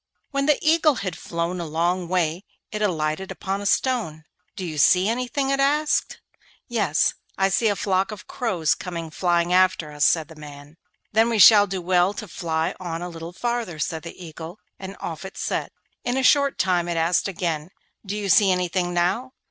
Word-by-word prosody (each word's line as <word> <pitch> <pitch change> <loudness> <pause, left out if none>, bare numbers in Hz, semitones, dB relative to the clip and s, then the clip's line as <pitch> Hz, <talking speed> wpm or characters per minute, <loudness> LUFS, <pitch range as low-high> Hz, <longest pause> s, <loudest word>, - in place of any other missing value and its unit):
When 275 0 0
the 300 - +4
Eagle 310 -2 +4
had 185 -6 -4
flown 170 +2 -3
a - - -4
long 170 +3 0
way 175 0 0 0.3
it 210 -1 -4
alighted 165 -2 -1
on 195 +1 -2
a 205 - -2
stone. 205 - 0 0.3
'Do 185 - -5
you 155 -3 -4
see 180 +5 +5
anything?' 250 +4 -1
it 275 - 0
asked. 295 +2 +1 0.5
'Yes; 205 - +1 0.2
I 195 0 +2
see 210 +4 +2
a 205 - +2
flock 190 -1 0
of 210 -1 -9
crows 190 - 0
coming 170 -3 -6
flying 175 0 +1
after 185 -4 +2
us,' 145 0 -2
said 160 -1 +3
the 160 - -13
man. 145 0 -12 0.3
'Then 225 +2 +3
we 230 - 0
shall 205 +1 +8
do 190 -2 -4
well 180 +2 +2
to 215 - -6
fly 160 -1 -2
on 175 -2 -5
a 180 - -5
little 165 0 -8
farther,' 235 -3 -3
said 160 +2 -3
the 170 +1 -10
Eagle, 165 +3 -9 0.2
and 195 +1 -8
off 160 0 -6
it 190 - -9
set. - - -2 0.3
In 245 +1 -1
a 265 - 0
short 280 +1 +4
time 180 -2 +1
it 170 -1 -2
asked 165 +4 +2
again, 165 -4 -3 0.3
'Do 205 0 -4
you 205 -1 -3
see 200 0 +5
anything 180 0 -1
now? 230 +10 0
185 Hz, 195 wpm, -23 LUFS, 165-210 Hz, 0.5 s, shall